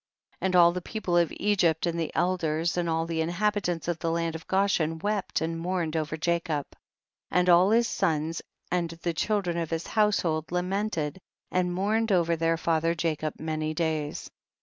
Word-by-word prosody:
30. - - -3
And 185 - 0
all 170 -1 +7
the 180 +1 -4
people 190 -2 -3
of 170 -2 +3
Egypt 180 -6 +2
and 170 -1 -1
the 165 - -2
elders 170 -2 0
and 175 -1 0
all 165 0 0
the 165 -1 -1
inhabitants 175 0 -1
of 170 -1 -1
the 165 - -1
land 165 0 -1
of 160 - -8
Goshen 190 -5 +1
wept 205 +3 -1
and 165 +1 -2
mourned 170 -2 -2
over 155 0 -2
Jacob, 165 -2 -1 0.6
and 180 0 +2
all 180 +2 +6
his 230 +2 +4
sons 160 -2 -1 0.3
and 175 -2 0
the 165 +1 -3
children 180 0 0
of 165 -2 -2
his 165 0 -2
household 180 -8 +1
lamented 180 -3 -1 0.3
and 180 -1 +1
mourned 210 +5 0
over 170 -3 +3
their 165 0 +1
father 165 0 +1
Jacob 155 -2 -2
many 155 0 -2
days. 155 -2 -2
170 Hz, 175 wpm, -27 LUFS, 160-180 Hz, 0.6 s, all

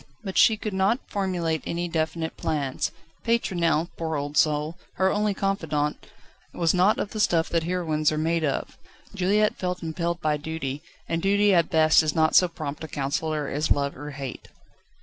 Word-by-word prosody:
But 190 - -5
she 220 - +5
could 210 -1 -4
not 190 +6 +2
formulate 175 -5 -1
any 175 +1 -2
definite 160 0 -2
plans. 140 -4 -2 0.3
Pétronelle, 175 -8 +1
poor 160 -1 -2
old 145 0 -3
soul, 150 +2 +2 0.2
her 190 +1 +2
only 210 -1 0
confidante, 160 -7 -1 0.5
was 170 -2 +2
not 185 +4 +4
of 205 - -3
the 215 - -5
stuff 170 -6 +2
that 165 -1 0
heroines 160 -4 0
are 155 - -2
made 165 +1 0
of. 145 - -2 0.3
Juliette 205 +2 +2
felt 180 -1 -3
impelled 170 +1 -2
by 155 -2 0
duty, 150 -2 -4 0.3
and 165 0 -1
duty 205 +1 +3
at 170 -2 +3
best 155 -1 +5
is 155 0 -1
not 160 -1 +3
so 180 - +6
prompt 155 -3 -6
a - - -5
counsellor 150 +1 -2
as 150 +3 -1
love 140 0 +1
or 145 +2 -7
hate. 135 -3 -7
165 Hz, 175 wpm, -25 LUFS, 155-185 Hz, 0.5 s, so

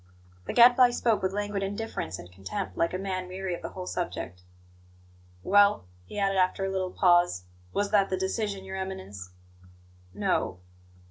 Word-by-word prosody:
The - - -2
Gadfly 245 +1 +7
spoke 235 -2 +1
with 190 0 0
languid 205 0 -2
indifference 195 - -4
and 90 - -11
contempt, 95 0 -5
like 165 - +1
a 185 - -2
man 185 -1 -3
weary 185 0 -4
of 170 - -5
the - - -5
whole 185 -1 -7
subject. 90 - -4 1.0
"Well?" 205 - +4 0.2
he 95 - -9
added 195 -1 +1
after 185 +1 +2
a 195 - -2
little 190 -1 -1
pause. 175 - +3 0.3
"Was 205 0 -1
that 200 -2 +4
the 185 - 0
decision, 195 +1 -2
Your 190 0 -6
Eminence?" 190 - -6 0.8
"No." 90 - -1
190 Hz, 160 wpm, -28 LUFS, 175-200 Hz, 1.0 s, Gadfly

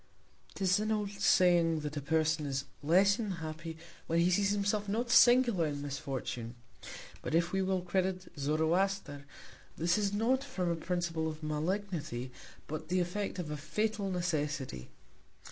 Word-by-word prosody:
'Tis 190 0 +2
an 215 +1 -1
old 210 -2 -1
saying, 175 -5 +3
that 150 0 -5
a 145 - -2
Person 155 +1 +1
is 140 0 -2 0.2
less 190 +7 +4
unhappy 165 -5 -5 0.3
when 165 - +1
he 170 +2 +4
sees 195 +2 +3
himself 205 0 0
not 235 +4 -1
singular 240 -9 +6
in 145 -1 -3
Misfortune. 135 -4 -4 0.7
But - - -2
if 170 +1 +2
we 195 - +1
will 190 -1 0
credit 185 +1 -1
Zoroaster, 160 +1 0 0.5
this 170 +4 +2
is 200 -1 +1
not 235 +6 +1
from 185 -11 -2
a - - 0
Principle 165 -1 -2
of 155 0 -6
Malignity, 155 - -2 0.3
but 155 +1 -6
the 185 +2 +1
Effect 185 +3 -2
of 165 -4 -4
a 150 - -3
fatal 200 +7 -1
Necessity. 150 - -2
175 Hz, 150 wpm, -32 LUFS, 155-195 Hz, 0.7 s, singular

